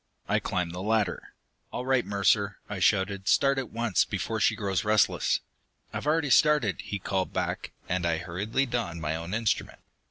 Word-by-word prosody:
I -, -, +2 dB
climbed 90 Hz, -2 st, -2 dB
the 90 Hz, -, -5 dB
ladder. 105 Hz, -3 st, -1 dB, 0.4 s
"All 125 Hz, -, -4 dB
right, 130 Hz, -2 st, +2 dB
Mercer," 100 Hz, 0 st, +1 dB
I 105 Hz, -2 st, -5 dB
shouted. 95 Hz, 0 st, +1 dB
"Start 135 Hz, -1 st, +4 dB
at 130 Hz, -, -5 dB
once, 115 Hz, -5 st, +1 dB
before -, -, -3 dB
she -, -, +3 dB
grows 95 Hz, -2 st, -1 dB
restless!" 105 Hz, 0 st, +2 dB, 0.5 s
"I've -, -, -4 dB
already 155 Hz, -2 st, +2 dB
started!" 135 Hz, -, +4 dB
he 100 Hz, -, -4 dB
called 95 Hz, -1 st, -2 dB
back, -, -, -2 dB, 0.2 s
and 90 Hz, 0 st, -1 dB
I 85 Hz, -1 st, +1 dB
hurriedly 95 Hz, +10 st, -1 dB
donned 115 Hz, -9 st, -3 dB
my 75 Hz, +1 st, -1 dB
own 85 Hz, +4 st, -4 dB
instrument. 115 Hz, -2 st, -1 dB
100 Hz, 170 wpm, -28 LUFS, 90-120 Hz, 0.5 s, Start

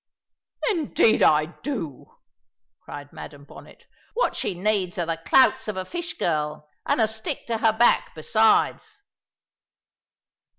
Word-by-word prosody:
"Indeed 310 Hz, -, +2 dB
I 150 Hz, 0 st, +4 dB
do!" 170 Hz, -, -7 dB, 0.6 s
cried 145 Hz, 0 st, -10 dB
Madam 145 Hz, -1 st, -10 dB
Bonnet. -, -, -15 dB, 0.3 s
"What -, -, 0 dB
she 185 Hz, -, -2 dB
needs 190 Hz, -1 st, -1 dB
are 175 Hz, -, -1 dB
the 165 Hz, 0 st, -4 dB
clouts 260 Hz, +4 st, +4 dB
of 210 Hz, -3 st, -4 dB
a 185 Hz, -, -3 dB
fish 345 Hz, -, -6 dB
girl, 150 Hz, -2 st, -2 dB, 0.2 s
and -, -, +1 dB
a 220 Hz, -, +4 dB
stick 220 Hz, 0 st, -5 dB
to 230 Hz, -2 st, -2 dB
her 225 Hz, -1 st, +4 dB
back 235 Hz, +2 st, +2 dB
besides." 220 Hz, -, +1 dB
200 Hz, 130 wpm, -24 LUFS, 155-230 Hz, 0.6 s, I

